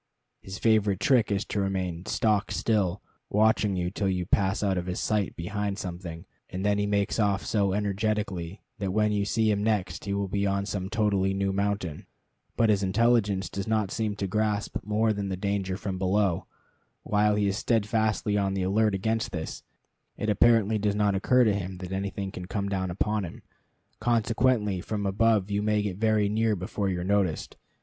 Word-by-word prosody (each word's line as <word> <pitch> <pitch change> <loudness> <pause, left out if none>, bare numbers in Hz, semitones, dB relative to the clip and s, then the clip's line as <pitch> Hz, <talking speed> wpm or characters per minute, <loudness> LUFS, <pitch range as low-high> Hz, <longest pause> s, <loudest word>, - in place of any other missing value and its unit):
His 95 0 -7
favorite 105 -4 +2
trick 125 -4 +3
is 100 0 0
to 100 - -2
remain 95 -2 -2
stock 105 -2 +1
still, 100 -4 0 0.3
watching 105 -1 +3
you 90 -1 -1
till 100 0 -1
you 90 -1 -1
pass 95 +2 +1
out 100 -2 +1
of 90 0 -3
his 90 - -3
sight 105 -3 0
behind 100 +3 -3
something, 85 -3 -6 0.2
and 95 +2 -4
then 105 0 +2
he 105 - 0
makes 100 +2 0
off 100 -2 +1
so 100 -3 +1
energetically 100 -3 -2 0.2
that 95 -2 -2
when 105 0 +2
you 100 -1 0
see 110 +1 +2
him 100 0 0
next 100 -5 -1
he 100 - -2
will 100 0 -1
be 100 +1 0
on 100 0 0
some 95 -2 -3
totally 100 -3 +1
new 95 0 0
mountain. 100 -5 -2 0.5
But 115 -2 +4
his 100 -1 +2
intelligence 100 -1 +2
does 100 +4 -5
not 110 -3 0
seem 110 -2 -1
to 100 - -3
grasp 105 +1 -1
more 110 +1 +1
than 100 -1 -3
the 95 - -3
danger 95 -1 -2
from 95 -2 -4
below. 95 -1 +1 0.6
While 105 0 +2
he 105 -1 +1
is 100 0 0
steadfastly 110 -2 +1
on 100 -1 0
the 95 - -1
alert 105 +2 +2
against 110 +3 -1
this, 80 -3 -5 0.6
it 105 - 0
apparently 110 0 +4
does 105 0 0
not 105 -1 +2
occur 125 +6 +3
to 110 -3 +3
him 95 -2 -4
that 90 0 -7
anything 95 0 -3
can 90 -1 -7
come 100 0 -2
down 95 -2 -1
upon 105 +3 -1
him. 85 - -8 0.6
Consequently 115 -3 +1
from 105 +1 -3
above 105 0 +2
you 100 0 +1
may 105 0 +1
get 95 -3 -3
very 110 -1 +2
near 110 +1 +1
before 95 +2 -2
you 90 -2 -2
are - - -3
noticed. 95 -4 0
100 Hz, 190 wpm, -27 LUFS, 95-105 Hz, 0.6 s, But